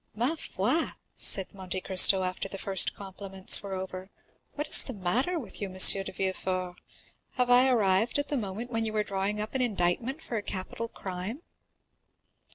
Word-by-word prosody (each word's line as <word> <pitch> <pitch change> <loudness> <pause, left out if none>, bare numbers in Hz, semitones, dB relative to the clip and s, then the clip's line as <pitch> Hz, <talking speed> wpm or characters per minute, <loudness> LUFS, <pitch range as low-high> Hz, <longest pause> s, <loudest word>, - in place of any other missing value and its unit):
"Ma 245 +8 0
foi!" - - -1 0.3
said 190 -2 0
Monte 185 -1 -5
Cristo, 190 0 +6
after 185 +1 -3
the 195 - -6
first 190 -1 +1
compliments 195 -1 -1
were 195 -1 -6
over, 185 0 -7 0.4
"what 295 - -4
is - - +7
the 260 - -5
matter 240 - -1
with 225 - -8
you, 200 - -3
M. 185 - -11
de 195 +1 +7
Villefort? 185 -1 -4 0.6
Have 250 -1 0
I 250 +2 +6
arrived 215 -1 +1
at 285 0 -3
the 290 - -1
moment 225 +1 -5
when 225 -1 -2
you 220 -1 -4
were 215 -1 0
drawing 200 +1 -3
up 210 +1 -5
an 265 - 0
indictment 230 - -1
for 240 -7 -6
a - - -3
capital 205 +4 -6
crime?" 195 - -7
200 Hz, 175 wpm, -27 LUFS, 190-240 Hz, 0.6 s, is